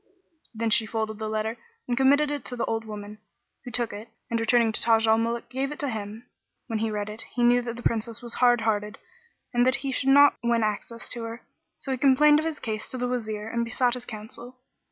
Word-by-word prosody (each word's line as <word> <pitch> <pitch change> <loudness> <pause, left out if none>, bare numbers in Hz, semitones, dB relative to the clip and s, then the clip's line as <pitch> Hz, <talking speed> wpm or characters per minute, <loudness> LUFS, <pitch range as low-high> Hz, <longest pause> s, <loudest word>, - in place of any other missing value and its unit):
Then 225 0 -1
she 220 0 +3
folded 220 -1 -3
the 215 0 -3
letter 220 +1 -2 0.3
and 245 - 0
committed 285 +3 +4
it 290 -1 -3
to 250 - -4
the 235 - -1
old 225 0 -2
woman, 210 0 -8 0.4
who 250 - -7
took 240 -2 0
it 210 +3 -8 0.2
and 230 - +1
returning 225 0 +3
to - - -1
Taj 225 -1 +4
al 220 0 +4
Muluk, 230 +1 -2
gave 265 +3 -2
it 295 - -6
to 285 - -2
him. 215 +1 -6 0.4
When 225 -3 -2
he 225 0 0
read 210 -1 -3
it, 215 +1 -4
he 245 - +1
knew 245 +1 +5
that 235 -1 -5
the 240 - -9
Princess 230 0 -1
was 235 -1 -7
hard 245 -2 +4
hearted 210 -1 -1 0.6
and 240 0 +4
that 255 +1 +3
he 270 - 0
should 265 +1 0
not 285 +1 +7
win 235 -1 +2
access 215 +2 -3
to 240 - -2
her; 230 +1 -7 0.3
so 270 - -4
he 260 - -1
complained 295 +3 +6
of 315 - -2
his 320 -2 -3
case 215 -2 -4
to 255 - -5
the 250 0 -1
Wazir 220 -4 -3
and 235 +1 -1
besought 245 +1 +1
his 250 -1 -4
counsel. 230 +3 -8
235 Hz, 235 wpm, -26 LUFS, 220-250 Hz, 0.6 s, not